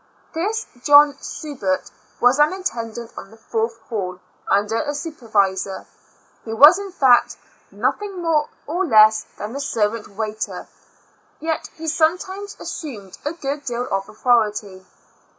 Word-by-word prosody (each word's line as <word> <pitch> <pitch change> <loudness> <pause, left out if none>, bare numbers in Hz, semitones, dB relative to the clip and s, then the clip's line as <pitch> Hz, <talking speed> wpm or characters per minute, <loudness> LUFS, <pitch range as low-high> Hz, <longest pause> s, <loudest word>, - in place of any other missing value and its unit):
This 415 +7 -1 0.2
John 290 -1 +7
Subert 250 -12 -3 0.3
was 245 +3 +4
an 295 +4 +5
attendant 235 - -4
on - - -9
the 225 - -16
fourth 225 +1 -2
hall, 185 -5 -4 0.3
under 205 +3 +2
a 290 -1 -3
supervisor; 210 - -1 0.6
he 225 - -5
was, 300 - +8
in. 400 -1 -6
fact, 265 -8 +4 0.3
nothing 405 -3 -2
more 320 -3 +1 0.2
nor 345 +6 0
less 215 -3 +6
than, 215 +5 -6
a - - -3
servant 225 -5 -1
waiter; 215 +1 -5 0.7
yet 320 0 -3
he 320 0 -7
sometimes 370 +6 0
assumed 215 - -7
a 295 - -1
good 290 -3 -4
deal 245 0 -2
of 195 0 -1
authority. 210 -5 0
245 Hz, 135 wpm, -21 LUFS, 215-315 Hz, 0.7 s, was